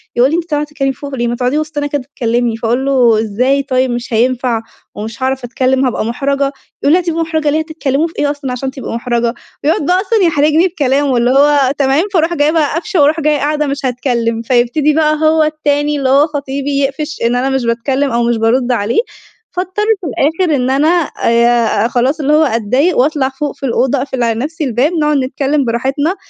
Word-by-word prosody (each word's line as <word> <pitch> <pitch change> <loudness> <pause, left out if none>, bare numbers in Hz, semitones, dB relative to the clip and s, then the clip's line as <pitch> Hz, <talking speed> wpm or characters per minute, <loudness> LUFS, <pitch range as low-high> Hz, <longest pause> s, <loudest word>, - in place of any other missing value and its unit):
يقول 250 +3 +4
لي: 320 - 0
"أنتِ 340 0 -3
طالعة 295 0 0
تتكلّمي 275 -2 -2
فوق 280 0 -7
ليه؟ 240 -2 -1
ما 240 - -1
تقعدي 250 +4 -1
وسطنا 300 -1 -3
كده 290 -1 -2
اتكلّمي" 240 -3 -2
فأقول 235 +4 -1
له: 245 -5 +3
"إزاي 250 +6 0
طيب 260 -2 0
مش 240 0 -4
هينفع، 240 0 +1 0.3
ومش 225 +5 -6
هاعرف 265 -1 -1
أتكلّم 260 +2 0
هابقى 240 -3 -1
محرجة" 275 +3 -1 0.3
يقول 290 - +4
لي: 365 - +5
"هتبقي 335 -2 -2
محرجة 315 -2 -1
ليه 310 - +1
هتتكلّموا 315 -1 -1
في 330 - -14
إيه 290 0 +1
أصلًا 285 -3 -5
عشان 265 +2 -3
تبقي 265 -3 -7
محرجة" 235 0 -1 0.3
يقعد 300 0 +1
بقى 360 +4 +2
أصلًا 435 +3 0
يحرجني 310 +3 +3
بكلامه 280 -5 0
اللي 245 +2 +2
هو 280 -1 +4
تمام 275 +3 +2
فاروح 335 -1 +2
جاية 295 -2 +2
بقى 310 -3 +1
قافشة 355 +1 0
وأروح 300 +3 +3
جاية 300 -1 +1
قاعدة 300 +1 -1
مش 275 0 -3
هاتكلّم، 235 -2 -1
فيبتدي 250 +5 +1
بقى 310 0 +2
هو 315 0 +3
التاني 295 -1 0
اللي 270 -2 0
هو 280 +3 +4
خطيبي 280 -1 -4
يقفش 280 +3 -3
إن 235 +1 +1
أنا 255 +2 0
مش 265 -2 -1
باتكلّم 260 +4 0
أو 235 0 +1
مش 235 -1 +1
بارُد 240 +3 +1
عليه، 230 - 0 0.6
فاضطر 370 +3 -2 0.2
في 350 - -5
الآخر 315 +4 0
إن 255 -1 0
أنا 280 +4 +2 0.4
آآ 235 -2 +2
خلاص 255 +5 0
اللي 295 0 +1
هو 310 +1 +5
أتضايق 255 - +1
وأطلع 270 0 +1
فوق 285 +2 -4
في - - -6
الأوضة 260 +2 +1
أقفل 260 -2 -2
على 230 -1 0
نفْسي 310 +5 -4
الباب، 260 +3 +1
نقعد 300 -3 +1
نتكلّم 275 +2 -1
براحتنا، 270 +8 -1
275 Hz, 205 wpm, -14 LUFS, 245-300 Hz, 0.6 s, لي